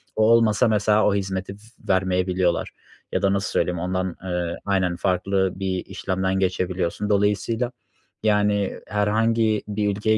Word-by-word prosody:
O 110 - +2
olmasa 115 0 +4
mesela 105 0 +3
o 100 - +2
hizmeti 95 0 -3 0.3
vermeyebiliyorlar 90 -1 +1 0.4
ya - - 0
da 100 0 +2
nasıl 100 +1 -1
söyleyeyim, 90 0 0
ondan, 95 0 -2
eee 90 -2 -2
Aynen, 95 -3 +1
farklı 95 +1 0
bir 95 -1 -2
işlemden 95 0 -2
geçebiliyorsun. 90 +1 -1
Dolayısıyla, 105 +4 +1 0.5
yani, 105 -2 +1
herhangi 110 +1 +1
bir 105 0 -1
ülkeye 110 +2 +1
100 Hz, 130 wpm, -23 LUFS, 95-105 Hz, 0.5 s, olmasa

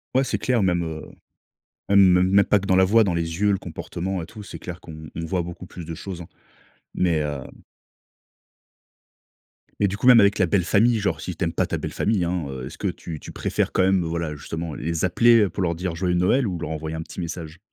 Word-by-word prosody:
Ouais, 135 - +4
c'est - - -1
clair, 125 -4 +1
même, 90 -2 +1
heu, 80 -1 -5 0.9
même 95 -2 +5
même 100 +1 +5
pas 105 - +3
que 100 - -7
dans 95 - +3
la 95 - +6
voix, 110 +4 +5
dans 95 - 0
les 85 +1 -2
yeux, 105 0 +4
le 95 - +1
comportement 90 +2 -5
et - - -6
tout, 105 +4 -11
c'est - - -9
clair 90 -1 -7
qu'on 80 -1 -10
on 85 - -3
voit 90 +2 -1
beaucoup 85 +1 -8
plus 85 0 -9
de 80 0 -6
choses, 90 0 -7
hein. 85 - -9 0.7
Mais 85 -3 +1
hem 75 -3 -3 2.3
mais 100 - +3
du 100 - -3
coup, 125 - 0
même 125 -2 +9
avec 100 0 +4
la 95 - +5
belle 95 +1 +2
famille, 110 +6 +3
genre 85 -6 -1
si 90 - -5
tu 90 - -3
aimes 85 -1 -1
pas - - 0
ta - - -2
belle - - -5
famille, 105 -5 +1
hein, 85 -3 -1
heu, 65 -2 -6
est-ce - - -9
que - - -1
tu 80 -3 -5
tu - - -10
préfères - - -1
quand - - +2
même, 95 -1 +3
heu, - - -3
voilà 80 -2 -3
justement 80 +2 -5
les 80 +3 -2
appeler, 115 +6 +5
heu, 100 - +2
pour 95 - -4
leur 85 -1 0
dire 90 0 -3
joyeux 90 +1 0
Noël 110 +8 +2
ou 90 -3 -3
leur 85 - -4
envoyer 80 0 -4
un 80 - -4
petit - - -10
message? 85 -1 -6
90 Hz, 245 wpm, -23 LUFS, 80-100 Hz, 2.3 s, même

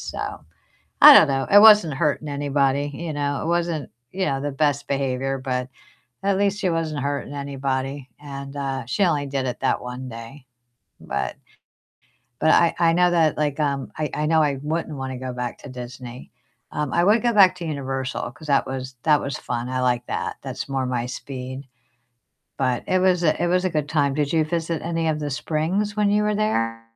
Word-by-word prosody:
so - - -5 0.6
I - - +11
don't - - +8
know. 135 -1 -1
It 205 - +8
wasn't 210 -8 +7
hurting 150 +1 -1
anybody, 140 0 0
you 170 0 -5
know? 145 -1 -2
It - - -4
wasn't, 170 -3 -1 0.2
you 190 0 -1
know, 135 -1 -1
the 145 0 -3
best 145 0 0
behavior, 135 -1 -1
but 125 -1 -3 0.6
at 195 -1 +2
least 200 0 +1
she 190 - 0
wasn't 155 -4 -2
hurting 140 0 -3
anybody 135 -1 -3
and, 140 -1 -8
uh, 135 -2 -3
she 200 - 0
only 145 -4 0
did 135 -1 -2
it 125 -1 -4
that - - +1
one 125 +1 -7
day, 115 +4 -10 0.6
but 65 -2 -3 1.1
but 155 - +3
I 170 - +4
I 170 -1 +4
know 180 +1 +4
that, 160 -4 +2
like, 150 -1 -1
um 140 -2 -1
I 155 -1 -2
I 150 - -1
know 160 +1 +3
I 140 -2 0
wouldn't 155 -1 -3
wanna 130 -1 -5
go 130 0 -5
back 125 -1 -4
to - - -11
Disney. 125 0 -9 0.4
Um, 150 -2 -2
I 170 - +3
would 215 +3 +4
go 240 - +3
back 190 -3 +6
to 175 -2 -7
Universal 135 -3 -3
'cause 155 - -13
that 140 -2 +2
was 130 0 -5
that 150 -2 +4
was 140 -1 -4
fun, 120 0 -4
I 130 0 -2
liked 125 -1 0
that, - - -3
that's - - -5
more 135 -1 -1
my 125 -1 -2
speed. 130 +1 -7 1.0
But 130 -2 0
it 185 - +2
was 180 -1 +3
a 155 - +2
it - - +2
was 180 +1 +1
a 185 - +1
good 150 -2 -2
time. 145 -3 +1
Did 145 0 -1
you 160 -1 +3
visit 165 0 -2
any 165 -1 -1
of 155 -1 -1
the 145 -1 -3
springs 175 +9 -1
when 205 -1 +2
you 210 +1 +2
were 210 0 +1
there? 115 - -1
145 Hz, 205 wpm, -23 LUFS, 130-165 Hz, 1.1 s, I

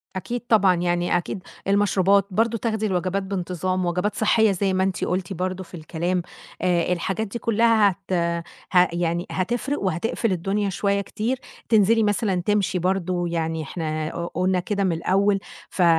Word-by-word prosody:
أكيد 235 +6 -3
طبعًا، 200 -5 +5
يعني 175 0 +1
أكيد 180 +2 -5 0.2
المشروبات 200 -1 +3
برضه، 230 +4 +1
تاخدي 220 -1 -1
الوجبات 190 0 0
بانتظام، 185 -1 -2
وجبات 180 +4 -1
صحيّة 220 0 +3
زي 195 0 0
ما 185 0 +2
أنتِ 190 -1 -1
قُلتِ 185 0 -2
برضه 185 +1 -3
في 185 - -20
الكلام، 175 +3 -2 0.4
آآ 175 -1 +2
الحاجات 195 +5 -2
دي 235 +4 -5
كلّها 225 -2 +4
هت 190 +1 -13 0.6
ها 180 -1 +6
يعني 170 0 -1
هتفرق 240 +8 -1
وهتقفل 195 +4 -1
الدنيا 195 +3 0
شوية 200 +1 0
كتير، 230 +6 -2 0.3
تنزلي 220 0 +4
مثلًا 205 -3 +1
تمشي 200 -3 +1
برضه، 180 -1 0
يعني 165 -1 -2
إحنا 155 0 -3
ق 170 0 -4
قلنا 185 +1 +1
كده 200 +2 -1
من 185 - +2
الأول 195 +4 +2 0.3
ف - - -3
أ - - +6
190 Hz, 160 wpm, -23 LUFS, 175-205 Hz, 0.6 s, ها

